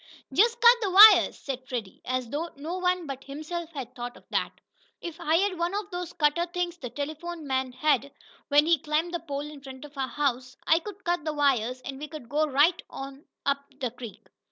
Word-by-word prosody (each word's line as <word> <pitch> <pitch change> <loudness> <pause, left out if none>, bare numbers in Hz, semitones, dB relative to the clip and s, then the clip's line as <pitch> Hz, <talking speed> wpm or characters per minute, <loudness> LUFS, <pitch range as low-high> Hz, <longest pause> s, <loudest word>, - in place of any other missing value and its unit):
"Just 465 - +4
cut 475 +1 +8
the 410 - 0
wires!" 415 +4 +8
said 260 -2 -6
Freddie, 230 -7 -5
as 255 -1 -1
though 320 +4 -2
no 320 +6 -5
one 360 -1 +1
but 270 -2 -6
himself 310 +4 -6
had 260 -4 -6
thought 245 0 -7
of - - -20
that. - - 0 0.5
"If 340 -2 -7
I 315 - +1
had 370 0 +1
one 345 +3 -1
of 410 -1 -4
those 355 -1 -4
cutter 335 +2 +1
things 350 0 -3
the 250 - -6
telephone 310 +4 -5
man 260 -1 -1
had, 280 +1 +1 0.4
when 290 +1 +5
he 335 -1 +3
climbed 310 +4 -1
the 345 - -1
pole 285 -3 -5
in 300 -2 -11
front 265 0 -10
of 295 0 -14
our 270 -1 -2
house, 260 -3 -2
I 320 - +4
could 400 +2 -10
cut 345 -2 0
the 310 -1 -2
wires 255 -4 +1
and 270 +1 -7
we 300 - -6
could 300 -7 -10
go 300 +3 +2
right 295 +5 +3
on 275 +1 -8 0.2
up 280 0 +1 0.2
the 250 -4 -2
creek." 235 -4 -10
295 Hz, 215 wpm, -27 LUFS, 270-345 Hz, 0.5 s, cut